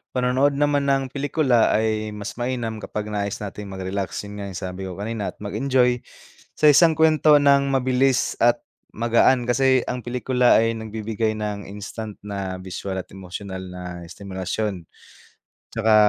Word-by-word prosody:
Panonood 130 +3 +2
naman 145 0 +1
ng 135 -1 +2
pelikula 135 -3 +2
ay 110 -1 0
mas 105 +1 -7
mainam 120 -2 -2
kapag 105 0 -5
nais 100 -1 -3
nating 105 0 -6
magrelax, 95 0 -4
yun 105 0 -9
nga 100 - -5
yung 100 - -7
sabi 95 +1 -5
ko 95 - -5
kanina 105 +2 -4
at - - -26
mag-enjoy 125 +4 +2 0.6
sa 150 - +5
isang 160 +3 +6
kuwento 155 -1 +5
ng 140 -1 +4
mabilis 130 0 +2
at 120 0 +3 0.3
magaan 120 +2 +3
kasi 130 +1 +4
ang 125 -1 -4
pelikula 125 -1 +3
ay 115 0 0
nagbibigay 110 0 -2
ng 105 -1 -4
instant 105 +2 -7
na 100 -2 -5
bisual 95 +1 -4
at - - -20
emosyonal 95 0 -7
na 90 -1 -7
estimulasyon. 95 +1 -4 0.9
'Tsaka 110 -1 +3
110 Hz, 150 wpm, -23 LUFS, 100-130 Hz, 0.9 s, isang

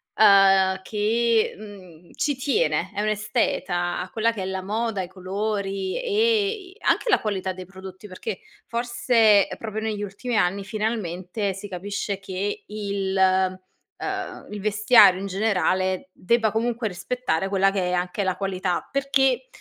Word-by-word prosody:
uhm, 195 -2 +5
che, 220 +3 +1
mhmm, 185 -5 -13
ci 290 -1 0
tiene, 285 - 0
è - - -4
un'esteta, 210 -5 -1
a 180 - -6
quella 230 +2 +1
che 210 - -5
è - - -3
la 190 0 -3
moda, 215 +1 -2
i 180 - -5
colori 195 +1 -3
e 445 -2 +2
i 390 -4 -7
anche - - +1
la 410 - +4
qualità 190 -3 -2
dei 185 0 -9
prodotti 190 +1 -11
perché, 185 +2 -5 0.3
forse 235 -3 +3
è - - -6
proprio 220 -1 -5
negli 215 -2 -3
ultimi 210 +5 -4
anni 195 0 +1
finalmente 200 -2 -2
si 200 +2 -8
capisce 200 +2 -4
che 195 +1 -4
il 200 -2 -3
uhm, 185 -1 +3 0.9
il 210 - -6
vestiario, 210 -1 +6
in 200 - -4
generale, 185 -2 0
debba 220 +4 +1
comunque 230 0 -1
rispettare 195 -1 -2
quella 195 0 +2
che 195 -2 -1
è - - -1
anche 180 +3 -1
la 185 -1 0
qualità; 185 -2 -2
perché 270 - +1
200 Hz, 150 wpm, -24 LUFS, 190-225 Hz, 0.9 s, vestiario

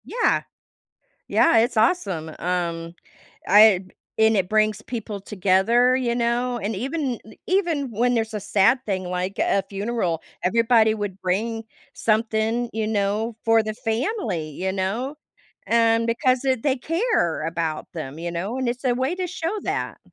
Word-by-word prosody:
Yeah. 475 - +1 0.9
Yeah, 330 - +4
it's 235 +2 +1
awesome, 200 - +1
um, 170 -1 -2 0.5
I 205 -1 +7
b 185 - -20 0.3
and 220 0 +4
it 185 -2 +1
brings 215 0 +2
people 220 -4 -6
together, 210 +6 +3
you 245 -2 0
know, 240 +1 0
and 215 0 -3
even 265 +2 -2
i 220 - -13 0.2
even 335 -8 +1
when 245 +3 +1
there's 225 -1 -1
a - - -1
sad 205 +5 +3
thing 190 -3 -1
like 180 +2 -3
a 195 - +2
funeral, 195 -5 -2 0.2
everybody 225 +2 +4
would 205 -3 -5
bring 225 +5 -1 0.3
something, 225 +1 0
you 220 0 -2
know, 215 +2 -1
for 225 0 +5
the 215 0 -4
family, 225 - -2
you 185 +6 -3
know, 210 +10 -2 0.5
and 230 0 +3
because 255 +2 +1
it 260 -4 +1
they 275 -2 +1
care 330 - 0
about 165 -1 -3
them, 155 -3 -6
you 170 +1 -3
know, 185 +8 -3
and 260 -2 -1
it's 245 +3 -4
a 250 -2 +2
way 260 +6 -1
to 370 -1 -2
show 350 +1 -3
that. - - -3
220 Hz, 160 wpm, -23 LUFS, 190-245 Hz, 0.9 s, I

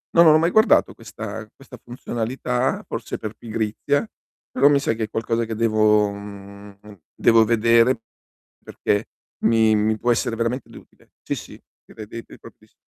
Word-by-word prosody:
no, 170 - +8
non 155 -2 +7
ho - - +6
mai 165 +2 +2
guardato 220 +4 +4
questa 110 -1 -8
questa 135 -2 -14
funzionalità, 125 +1 -3
forse - - -5
per 110 -1 -6
pigrizia, 110 - -2 0.5
però 135 +2 +4
mi 145 -1 +4
sa 115 - 0
che 110 - -4
è 105 - -4
qualcosa 115 +1 -1
che 115 - -5
devo 110 -2 +3
mhmm, 100 0 -11 0.3
devo 115 -1 +4
vedere, 115 +2 +3 0.6
perché 105 +2 -2 0.4
mi 110 -1 +4
mi 110 +1 +1
può 120 +2 +1
essere 115 0 0
veramente 115 +3 -3
utile. - - -17
Sì - - -3
sì, - - -11 0.2
credete 115 +1 -10
propis - - -17
115 Hz, 155 wpm, -22 LUFS, 110-125 Hz, 0.6 s, no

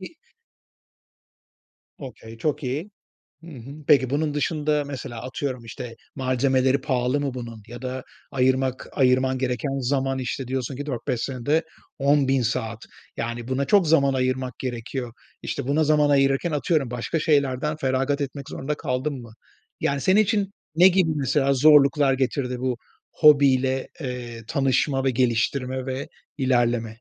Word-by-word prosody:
bi 190 - -7 1.9
Okay. 115 -4 -10
Çok 150 +3 -1
iyi. 145 +10 -3 0.5
Hı - - -12
hı. 130 0 -10 0.2
Peki, 135 -4 +5
bunun 150 +1 0
dışında, 150 0 0
mesela, 125 -4 -6
atıyorum, 130 -1 -4
işte, 115 +1 -8 0.2
malzemeleri 130 0 +1
pahalı 130 0 0
mı 140 -3 -2
bunun? 115 -3 -7
Ya 120 +1 -9
da 130 0 -4 0.3
ayırmak 130 0 +1
ayırman 130 -1 +2
gereken 135 +2 -2
zaman, 135 +1 0
işte, 130 +1 -4
diyorsun 130 0 -3
ki 145 +2 -5
4-5 120 -3 -3
senede 140 +5 0 0.4
10.000 135 -2 +3
saat. 115 -1 -2 0.4
Yani, 120 0 -4
buna 130 +2 0
çok 200 -6 +4
zaman 140 -4 +4
ayırmak 130 0 -1
gerekiyor. 125 -1 -4 0.3
İşte, 125 - -4
buna 155 +3 +2
zaman 150 -1 +3
ayırırken, 135 +4 +2
atıyorum, 145 -2 0
başka 125 +7 -2
şeylerden 145 -1 +1
feragat 135 +1 0
etmek 140 0 -5
zorunda 150 +3 -3
kaldın 130 0 -3
mı? 115 -2 -13 0.5
Yani, 140 -1 0
senin 195 +3 +4
için 200 -1 0 0.2
ne 180 +3 +8
gibi, 180 -3 +3
mesela, 140 -1 +1
zorluklar 140 0 +5
getirdi 130 -1 -1
bu 130 -2 -1 0.3
hobiyle, 135 -3 +4
eee, 120 -3 -6
tanışma 135 +1 +1
ve 135 - +2
geliştirme 125 +2 0
ve 130 +1 -4 0.3
ilerleme? 120 -3 +1
135 Hz, 140 wpm, -24 LUFS, 125-145 Hz, 1.9 s, ne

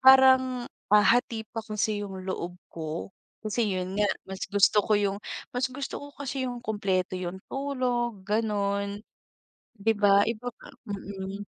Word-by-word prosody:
parang, 260 -1 +7 0.2
ah, 210 0 +6
hati 230 +1 +3
pa 225 +1 -5
kasi 215 -1 -1
yung 190 -2 -6
loob 180 -2 -3 0.2
ko, 160 +3 -5 0.3
kasi 215 +1 +1
'yon 185 0 -3
nga, 205 - +4 0.2
mas 190 0 -7
gusto 205 +1 +5
ko 215 - 0
yung 200 -1 +1 0.4
mas 255 +2 +1
gusto 270 +2 -5
ko 285 - -8
kasi 270 -2 -2
yung 245 -1 -4
kumpleto, 195 -4 0
yung 180 0 -4
tulog 250 -6 -1
gan'on, 200 -2 0 0.8
'di 225 +1 +2
ba? 200 -1 +6
Iba 230 +1 -4
nga - - -12 0.2
mm. 195 -1 -5
210 Hz, 150 wpm, -28 LUFS, 195-245 Hz, 0.8 s, parang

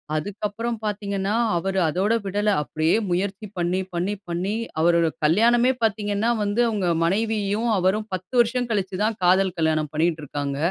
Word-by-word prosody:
அதுக்கப்புறம் 210 +7 -3
பாத்தீங்கன்னா, 200 -1 -2 0.2
அவரு 190 +2 -1
அதோட 190 +7 +1
விடல, 205 +2 0
அப்படியே 155 +4 0 0.2
முயற்சி 195 +4 -2
பண்ணி, 175 +2 0
பண்ணி, 180 +4 -1
பண்ணி. 185 +5 -2 0.3
அவரோட 170 0 +4 0.2
கல்யாணமே 235 +9 +4
பார்த்தீங்கன்னா 210 +1 +1
வந்து, 205 +3 +1
அவங்க 200 -5 -1 0.2
மனைவியும் 215 +3 0
அவரும் 200 +4 +1
10 185 +6 -10
வருஷம் 240 +1 -1
கழிச்சுதான், 205 +1 -1
காதல் 185 0 +3
கல்யாணம் 155 -2 +1
பண்ணிட்டு 160 0 +1
இருக்காங்க. 140 -1 -4
195 Hz, 135 wpm, -23 LUFS, 175-215 Hz, 0.3 s, அவரோட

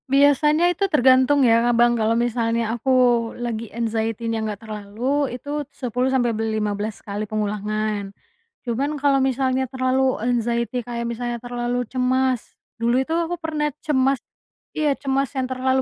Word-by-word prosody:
Biasanya 295 +5 +4
itu 395 +3 -1
tergantung 260 -1 +4
ya, 230 0 +4
Abang 240 0 +4
kalau 225 0 +1
misalnya 230 -1 0
aku 240 +3 -3 0.5
lagi 230 -2 -4
anxiety-nya 225 0 -2
nggak 215 0 -5
terlalu, 220 +7 -2
itu 290 +3 -4
10 250 -1 -1
sampai 245 -3 +1
be 220 - -3
lima 215 -1 -1
belas 210 +1 -4
kali 205 +1 -4
pengulangan. 210 -1 -2 0.6
Cuman 275 +6 -1
kalau 280 -1 +3
misalnya 260 0 +1
terlalu 260 0 +1
anxiety 235 +1 0
kayak 235 0 -5
misalnya 240 +1 -3
terlalu 245 0 -2
cemas, 255 -1 +1 0.4
dulu 240 +3 +3
itu 320 +5 -3
aku 335 +1 0
pernah 305 -2 -1 0.2
cemas 270 -3 +2 0.5
iya, 300 -2 +1
cemas 275 -1 0
yang 260 -1 0
terlalu 260 0 +1
245 Hz, 145 wpm, -22 LUFS, 225-265 Hz, 0.6 s, Biasanya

